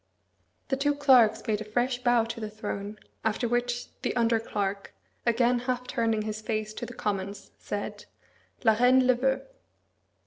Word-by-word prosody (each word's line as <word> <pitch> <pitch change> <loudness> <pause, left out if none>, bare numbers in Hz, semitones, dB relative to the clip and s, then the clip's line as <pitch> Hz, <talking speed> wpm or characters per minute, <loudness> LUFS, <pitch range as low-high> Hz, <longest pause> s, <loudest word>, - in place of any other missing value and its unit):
The 270 - +1
two 290 +1 +1
clerks 250 -6 +5
made 215 -3 0
a - - -2
fresh 245 +3 -1
bow 240 -2 +4
to 230 0 -6
the 215 -1 -4
throne, 210 -1 -5 0.3
after 220 +2 0
which 245 +1 -1 0.2
the - - -1
under 230 -1 +3
clerk, 200 -3 -3 0.3
again 240 +1 +3
half 250 0 -2
turning 225 -3 0
his 215 0 -4
face 215 -1 -2
to - - -6
the - - -10
Commons, 200 -1 -3
said, - - -5 0.6
"La 220 -2 +6
Reine 250 +3 +5
le 255 - +5
veut." 265 - 0
230 Hz, 165 wpm, -28 LUFS, 215-245 Hz, 0.6 s, La